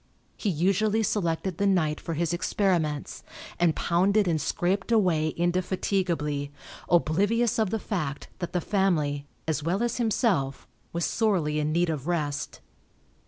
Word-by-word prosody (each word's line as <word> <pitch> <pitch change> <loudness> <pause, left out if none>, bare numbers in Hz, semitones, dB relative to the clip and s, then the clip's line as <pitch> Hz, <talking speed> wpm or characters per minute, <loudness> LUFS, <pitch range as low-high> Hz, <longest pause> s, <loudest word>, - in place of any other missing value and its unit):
He 210 - -2
usually 200 +6 +2
selected 180 -3 -1
the 200 - +2
night 160 -6 +1
for 165 - -4
his 170 +1 0
experiments, 170 -5 0 0.4
and 175 -2 +3
pounded 195 +4 +2
and 160 -3 +1
scraped 190 - -1
away 180 -8 +3
indefatigably, 175 -4 0 0.4
oblivious 205 +9 +2
of 215 -3 +2
the 225 - 0
fact 155 -10 -3
that 175 - -4
the 180 - 0
family, 155 -8 0 0.2
as 160 -1 0
well 180 +8 0
as 240 0 -1
himself, 200 - 0 0.3
was 170 0 -1
sorely 175 -9 +1
in 150 0 0
need 170 +1 +2
of 150 -1 -5
rest. 150 -5 -2
175 Hz, 140 wpm, -27 LUFS, 155-200 Hz, 0.4 s, and